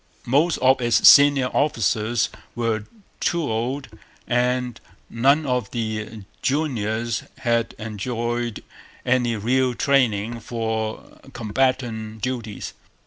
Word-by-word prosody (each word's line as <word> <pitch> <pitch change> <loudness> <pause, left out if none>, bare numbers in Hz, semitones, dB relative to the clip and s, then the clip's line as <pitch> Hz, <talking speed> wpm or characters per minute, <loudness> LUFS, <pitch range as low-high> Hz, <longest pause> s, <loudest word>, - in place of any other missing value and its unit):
Most 145 +7 +2
of 130 0 +4
its 120 -1 +4
senior 140 -3 +7
officers 115 -4 +1 0.3
were 115 -3 -1 0.3
too 170 -1 0
old; 130 +3 -2 0.4
and 125 -1 0 0.3
none 140 +6 +3
of 125 -6 -1
the 110 -2 -4 0.2
juniors 115 -6 -1 0.2
had 115 -1 0
enjoyed 120 +2 -3 0.4
any 125 -2 +2
real 125 +4 +1
training 115 -4 +1
for 110 -1 -4
combatant 110 -2 -1
duties. 120 -5 -4
120 Hz, 95 wpm, -23 LUFS, 110-130 Hz, 0.4 s, senior